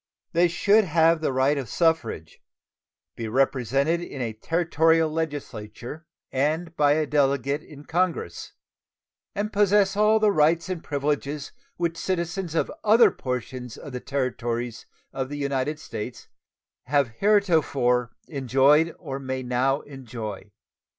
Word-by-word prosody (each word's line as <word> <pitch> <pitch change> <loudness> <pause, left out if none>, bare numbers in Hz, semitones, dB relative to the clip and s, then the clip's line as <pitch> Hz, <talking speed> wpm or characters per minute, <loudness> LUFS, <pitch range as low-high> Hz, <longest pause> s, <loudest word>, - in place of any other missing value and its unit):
They 175 +1 +4
should 205 +5 +3
have 165 -1 +3
the 155 - 0
right 135 +2 +2
of 130 -5 -6
suffrage, 160 - 0 0.7
be 115 - -5
represented 135 +6 +1
in 155 -5 -7
a 115 -3 -2
Territorial 165 +4 +2
legislature 145 -2 -5 0.2
and 155 +5 -1
by 145 -1 +4
a 155 0 +1
Delegate 140 -1 +1
in 145 -2 -14
Congress, 170 - -2 0.8
and 210 +1 -2
possess 200 -1 +3
all 215 +1 +4
the 215 -1 +4
rights 165 +1 +2
and 180 -3 -4
privileges 145 0 -2 0.3
which 170 -1 -1
citizens 175 -1 -2
of - - 0
other 220 +3 +6
portions 125 -1 -5
of 145 - -10
the 125 - -3
territories 120 -4 -3 0.3
of 130 -1 -3
the 145 - -5
United 140 +1 -1
States 125 -5 -7 0.6
have 140 -1 +2
heretofore 155 - +2 0.2
enjoyed 140 +3 +3
or 135 -5 -6
may 130 -1 -4
now 130 +3 +1
enjoy. 115 -7 -8
145 Hz, 130 wpm, -25 LUFS, 130-165 Hz, 0.8 s, other